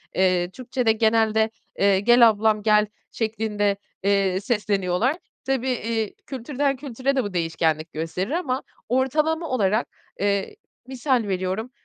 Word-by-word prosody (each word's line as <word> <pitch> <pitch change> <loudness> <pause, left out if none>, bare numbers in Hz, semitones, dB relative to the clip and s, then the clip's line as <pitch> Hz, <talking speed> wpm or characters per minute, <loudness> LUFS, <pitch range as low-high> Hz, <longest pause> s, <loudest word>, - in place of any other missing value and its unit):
Eee, 180 -2 +2
Türkçede 245 0 0
genelde, 220 0 +2 0.3
eee, 200 -1 +4
"Gel 240 +3 +7
ablam, 215 0 +1
gel." 210 0 +4 0.3
şeklinde, 215 -3 -1 0.3
eee, 195 -2 +2
sesleniyorlar. 205 - 0 0.3
Tabii, 265 -1 0
iii, 225 -3 -2
kültürden 275 +2 -1
kültüre 265 0 -2
de 260 - +2
bu 205 -2 -5
değişkenlik 165 -2 -1
gösterir 165 - -3
ama 285 -6 -1 0.3
ortalama 305 +6 +1
olarak, 215 -3 +1 0.3
eee, 200 - 0 0.3
misal 260 -1 0
veriyorum, 190 +5 -2
220 Hz, 120 wpm, -24 LUFS, 195-255 Hz, 0.3 s, Gel